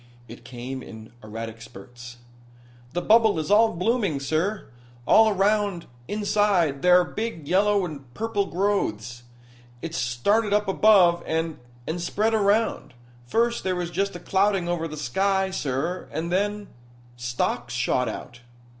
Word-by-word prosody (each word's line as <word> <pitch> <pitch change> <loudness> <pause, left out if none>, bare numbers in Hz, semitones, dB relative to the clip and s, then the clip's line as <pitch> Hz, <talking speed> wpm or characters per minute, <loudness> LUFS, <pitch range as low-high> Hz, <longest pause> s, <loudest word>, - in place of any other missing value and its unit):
It 115 +1 -12
came 130 +2 -7
in 110 -2 -11
erratic 110 +1 -7
spurts. 120 +3 -12 0.8
"The 175 - -2
bubble 220 -3 +4
is 160 +4 -3
all 220 +2 +5
blooming, 195 - 0
sir. 160 +9 -1 0.4
All 220 0 +6
around 200 -2 +1 0.2
inside 205 -8 +1
there 180 +1 +6
are - - -2
big 195 -7 -5
yellow 200 +2 +2
and 140 -7 -9
purple 215 -3 -1
growths. 120 - -1 0.6
It 165 -1 -5
started 185 - +1
up 210 0 +1
above, 190 -4 +5
and 160 -1 -2 0.3
and 170 +2 -3
spread 215 +6 0
around. 205 - +1 0.3
First 235 - 0
there 185 -1 -1
was 175 -1 -3
just 195 +1 -1
a - - -6
clouding 195 0 +1
over 175 -2 -1
of - - -5
the 155 - -7
sky, 190 +7 0
sir, 155 +3 -3
and 170 +2 -3
then 205 +2 -1 0.5
stalks 120 0 -3
shot 125 0 0
out." 120 -1 -8
175 Hz, 145 wpm, -24 LUFS, 135-205 Hz, 0.8 s, All